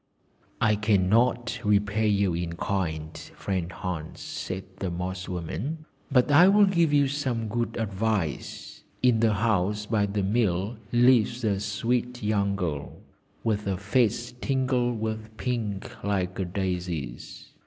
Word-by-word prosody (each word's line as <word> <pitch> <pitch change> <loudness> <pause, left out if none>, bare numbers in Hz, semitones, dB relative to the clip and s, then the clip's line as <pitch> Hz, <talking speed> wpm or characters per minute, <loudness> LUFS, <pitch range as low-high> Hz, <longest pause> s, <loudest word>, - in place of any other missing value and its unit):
'I 110 -2 +4
cannot 110 +4 +2
repay 105 +1 +2
you 100 -3 +2
in 85 0 -2
kind, 80 -4 -2
friend 85 +3 -4
Hans,' 85 -3 -5
said 95 0 -5 0.2
the 95 - -2
Moss 90 +1 -4
woman, 95 - -4 0.3
'but 130 +1 +4
I 170 +6 +8
will 205 +1 +6
give 170 -5 +2
you 145 -1 +4
some 130 -5 -2
good 120 +2 -2
advice. 105 - -2 0.2
In 125 -3 +4
the 110 -1 +3
house 105 -1 +1
by 105 -1 +1
the 100 0 -1
mill 100 0 0
lives 120 0 +4
a 100 -3 +1
sweet 120 +4 -1
young 100 -2 +1
girl, 80 -7 -3 0.5
with 105 -2 0
a 95 -2 0
face 120 +4 +1
tinged 130 -3 +1
with 110 0 -4
pink 110 -6 -3
like 95 -2 -1
a 95 - 0
daisy's. 85 -10 -4
105 Hz, 135 wpm, -27 LUFS, 95-120 Hz, 0.5 s, I